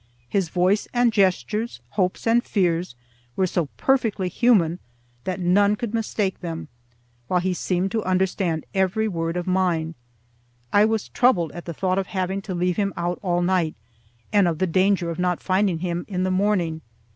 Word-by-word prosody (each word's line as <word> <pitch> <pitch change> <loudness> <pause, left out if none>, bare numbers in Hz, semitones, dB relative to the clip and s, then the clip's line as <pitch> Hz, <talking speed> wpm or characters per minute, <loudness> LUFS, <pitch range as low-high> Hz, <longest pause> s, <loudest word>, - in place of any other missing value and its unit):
His 185 +4 0
voice 185 +4 +1
and 240 -1 +3
gestures, 210 +3 +1
hopes 185 -3 -1
and 235 +1 +3
fears, 175 - 0 0.4
were 190 - +2
so 175 -3 -1
perfectly 225 -8 +1
human 180 -6 +3 0.5
that 185 0 -2
none 200 +3 +3
could 235 -1 -5
mistake 215 -3 -1
them; 165 -3 -6 0.6
while 180 - +2
he 185 +1 0
seemed 180 +1 -1
to 220 0 -1
understand 185 -3 0
every 195 +3 +1
word 165 -3 -2
of 175 - -2
mine. 180 -3 0 0.8
I 205 +1 +6
was 220 -1 -1
troubled 185 - +2
at 175 - -9
the 170 - -5
thought 185 +2 0
of 195 - -3
having 190 0 -2
to 195 -2 -5
leave 180 0 0
him 200 -1 0
out 175 +1 -2
all 175 -2 0
night, 175 -3 +1 0.6
and 200 -3 +5
of 165 -2 0
the 185 - +1
danger 185 0 +2
of 165 - -6
not 180 -1 +1
finding 190 -2 +1
him 175 -1 -2
in 185 -3 -2
the 185 - 0
morning. 185 -5 +1
185 Hz, 175 wpm, -23 LUFS, 175-205 Hz, 0.8 s, I